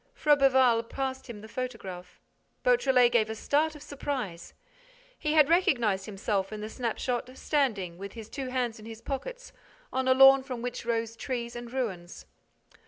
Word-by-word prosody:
Froberval 265 -5 +4
passed 265 -1 -4
him 215 -3 -8
the 220 - -10
photograph. 205 -7 -6 0.4
Beautrelet 265 - +4
gave 220 -3 +2
a 220 - -3
start 305 +7 +1
of 295 - -11
surprise. 260 -11 -5 0.6
He 300 -1 0
had 305 -3 +6
recognized 240 - +2
himself 195 -1 -2
in 215 - -5
the 215 +1 -5
snapshot, 245 +1 -2
standing, 205 - -1
with 200 0 -7
his 225 -2 -9
two 270 +2 -5
hands 250 -3 -2
in 215 - -11
his 225 -1 -8
pockets, - - -6 0.4
on 260 0 0
a 260 - +5
lawn 270 0 +8
from 255 -3 -6
which 245 -1 -5
rose 230 -1 -1
trees 235 -1 -4
and 240 0 -7
ruins. 190 -10 -4
245 Hz, 165 wpm, -28 LUFS, 220-270 Hz, 0.6 s, lawn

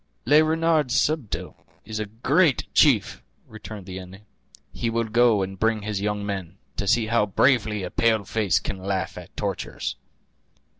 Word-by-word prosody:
"Le 150 +2 +6
Renard 160 -2 +2
Subtil 135 -2 -1 0.3
is 110 -1 -5
a 110 - -3
great 135 - +2
chief!" - - +3 0.3
returned 110 -2 -9
the 95 0 -7
Indian; 95 +3 -12 0.5
"he 115 - -2
will 115 +1 0
go 115 -2 +3
and 95 0 -6
bring 110 -1 +1
his 105 -2 -3
young 105 0 -2
men, 95 -3 -5 0.2
to 100 - -3
see 115 +2 +3
how 110 -1 +2
bravely 110 -1 +2
a 90 - -5
pale 110 -2 +2
face 100 -3 +1
can 95 - -5
laugh 95 0 -3
at - - -12
tortures." - - -4
110 Hz, 160 wpm, -24 LUFS, 100-120 Hz, 0.5 s, Le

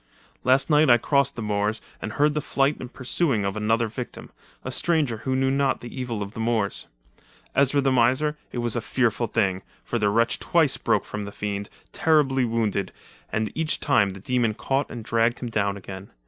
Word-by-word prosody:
"Last 130 +2 +4
night 150 -2 +4
I 120 - +8
crossed 140 +3 +1
the 115 - -5
moors, 105 +1 0 0.2
and 110 - -5
heard 150 +1 +2
the 150 - -1
flight 140 +1 +1
and 125 0 -8
pursuing 130 -4 0
of 100 +1 -2
another 115 +2 +1
victim, 120 +3 -7 0.3
a - - -3
stranger 150 -9 +1
who 130 +4 -2
knew 135 0 +2
not 135 -1 +1
the 120 - -9
evil 120 -5 -3
of 100 - -8
the - - -8
moors. 110 -3 -1 0.7
Ezra 140 +1 +3
the 135 -1 +2
miser, 130 +5 +3 0.2
it - - -6
was 120 -1 -1
a 120 - 0
fearful 120 0 0
thing, 95 -3 0 0.2
for 120 - -2
the 105 -1 +2
wretch 115 +3 +2
twice 160 -5 +3
broke - - 0
from 105 - -5
the 100 0 -6
fiend, 100 0 -4 0.2
terribly 135 -5 +2
wounded, 110 -4 -1 0.4
and 110 0 -1
each 160 -1 -1
time 120 -9 +3
the 95 0 -8
demon 115 0 0
caught 135 +4 -1
and 115 -3 -7
dragged 115 +1 +2
him 120 - -5
down 100 -2 0
again. 95 0 -9
120 Hz, 200 wpm, -25 LUFS, 105-135 Hz, 0.7 s, I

